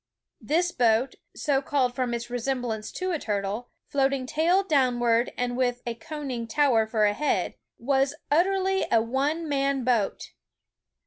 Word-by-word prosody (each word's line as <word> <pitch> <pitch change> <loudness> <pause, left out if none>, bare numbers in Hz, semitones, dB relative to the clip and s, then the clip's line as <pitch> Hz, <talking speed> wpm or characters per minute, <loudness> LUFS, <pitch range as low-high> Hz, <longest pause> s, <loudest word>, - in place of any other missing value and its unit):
This 350 +3 +1
boat, 240 0 +2 0.2
so 275 -2 +1
called 265 -3 0
from 245 -2 -1
its 235 +1 -6
resemblance 245 -3 -2
to 370 0 -2
a 330 - -1
turtle, 205 +2 -3 0.2
floating 270 -1 0
tail 340 +8 +2
downward 245 -7 +2
and 245 0 -1
with 245 -1 0
a 235 - -2
conning 260 -2 -5
tower 235 -4 +3
for 220 -1 +2
a 205 - +3
head, 295 +8 0 0.2
was 270 +3 +1 0.2
Uter 355 +6 +3
ally 385 0 +1
a 230 - +5
one 275 +8 -1
man 275 -2 0
boat. 235 -5 0
255 Hz, 150 wpm, -26 LUFS, 235-290 Hz, 0.2 s, a